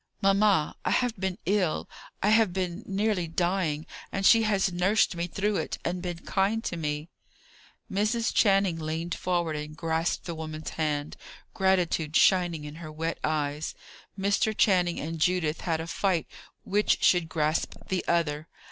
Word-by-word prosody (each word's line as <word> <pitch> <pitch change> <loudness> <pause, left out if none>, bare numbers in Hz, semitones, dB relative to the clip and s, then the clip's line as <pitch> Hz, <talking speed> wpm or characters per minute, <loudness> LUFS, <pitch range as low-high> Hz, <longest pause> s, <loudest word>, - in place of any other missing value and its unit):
"Mamma, 195 -4 +3
I - - 0
have 245 -2 +1
been 190 -1 -2
ill; 190 -4 +1 0.4
I 205 - +4
have 220 -3 +4
been 180 0 -2
nearly 195 -2 0
dying; 165 -2 0 0.3
and 195 0 -2
she 225 - +7
has 200 -4 +1
nursed 185 +3 +2
me 170 +1 -2
through 200 +3 -1
it, - - -3
and 175 +1 -2
been 175 -2 -5
kind 205 +4 +1
to 175 - -3
me." 150 0 -3 0.8
Mrs. 215 +4 0
Channing 195 -5 +3
leaned 160 +2 -3
forward 175 -3 -1
and 150 0 -6
grasped 165 +1 -1
the 170 - -4
woman's 155 -1 -6
hand, 150 -2 -2 0.4
gratitude 180 -5 +1
shining 175 -5 +3
in 150 +1 -8
her 160 -2 -8
wet 165 +2 -3
eyes. 150 0 -1 0.4
Mr. 200 +2 +1
Channing 180 -4 +3
and 165 +2 -4
Judith 165 -2 +1
had 165 -3 -1
a 160 - -4
fight 175 0 0 0.4
which 205 +2 +1
should 175 -3 +4
grasp 155 0 0
the 185 -1 0
other. 160 -2 0
175 Hz, 155 wpm, -27 LUFS, 160-195 Hz, 0.8 s, she